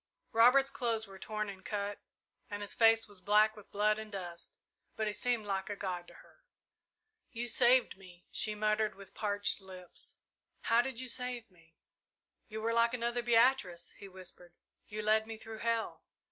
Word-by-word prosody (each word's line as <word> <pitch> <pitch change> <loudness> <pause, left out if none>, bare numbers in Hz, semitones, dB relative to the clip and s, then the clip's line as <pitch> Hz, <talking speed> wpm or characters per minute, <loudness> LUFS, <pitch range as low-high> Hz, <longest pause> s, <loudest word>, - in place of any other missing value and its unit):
Robert's 250 +4 +6
clothes 230 -5 0
were 195 -2 -12
torn 215 +1 -3
and 195 -1 -8
cut, 205 -1 -3 0.5
and 205 -1 -4
his 205 - -3
face 225 0 +5
was 205 -3 -7
black 210 +3 +4
with 210 -2 -14
blood 210 +1 +2
and 220 -1 -8
dust, 175 -3 -7 0.4
but 220 - -1
he 210 - -1
seemed 235 +1 0
like 195 0 -2
a 205 - -2
god 180 -3 -4
to - - -15
her. - - -18 0.9
"You 240 -1 -3
saved 240 0 +4
me," 180 -2 -15
she 215 -1 0
murmured, 215 0 +1
with 195 0 -13
parched 205 -1 -1
lips. 185 -2 -10 0.4
"How 230 +1 +4
did 255 -1 -4
you 255 - -4
save 245 -3 -2
me?" 165 -2 -24 0.7
"You 220 -1 -6
were 230 +1 +1
like 235 +1 +3
another 240 0 -1
Beatrice," 230 -7 +3
he 200 - -11
whispered, 180 -2 -9 0.3
"you 215 +1 -5
led 215 +1 +3
me 225 -1 -6
through 220 0 -9
hell!" 230 -1 -1
215 Hz, 175 wpm, -33 LUFS, 195-230 Hz, 0.9 s, Robert's